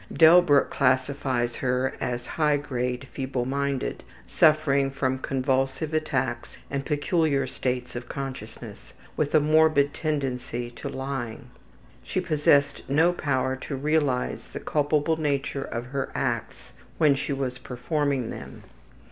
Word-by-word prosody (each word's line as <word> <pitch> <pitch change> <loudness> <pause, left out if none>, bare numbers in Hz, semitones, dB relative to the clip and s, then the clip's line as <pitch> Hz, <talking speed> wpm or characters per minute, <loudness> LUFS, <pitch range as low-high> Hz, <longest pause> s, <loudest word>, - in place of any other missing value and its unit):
Delbruck 160 -3 +6
classifies 130 -2 +1
her 125 0 0
as 120 0 -2
high 150 -2 +1
grade 125 -2 -3
feebleminded, 135 +1 -2 0.2
suffering 150 -3 +3
from 130 -1 -1
convulsive 135 +3 -1
attacks 135 -6 -2
and 135 0 -2
peculiar 150 -2 +1
states 125 -1 -3
of 120 0 -6
consciousness, 135 -2 -7 0.2
with 150 0 0
a - - +8
morbid 155 -1 +4
tendency 125 -5 -3
to - - -7
lying. 130 -4 -5 0.5
She - - -2
possessed 150 -4 +2
no 160 +5 +4
power 130 -5 0
to 135 +2 -5
realize 145 -2 0
the - - -6
culpable 150 +1 +1
nature 140 -2 -1
of 115 +1 -5
her 135 +1 -3
acts - - -3 0.3
when 150 -3 +5
she 140 +1 -3
was 135 -2 -2
performing 140 -1 -1
them. - - -9
140 Hz, 120 wpm, -26 LUFS, 130-150 Hz, 0.5 s, a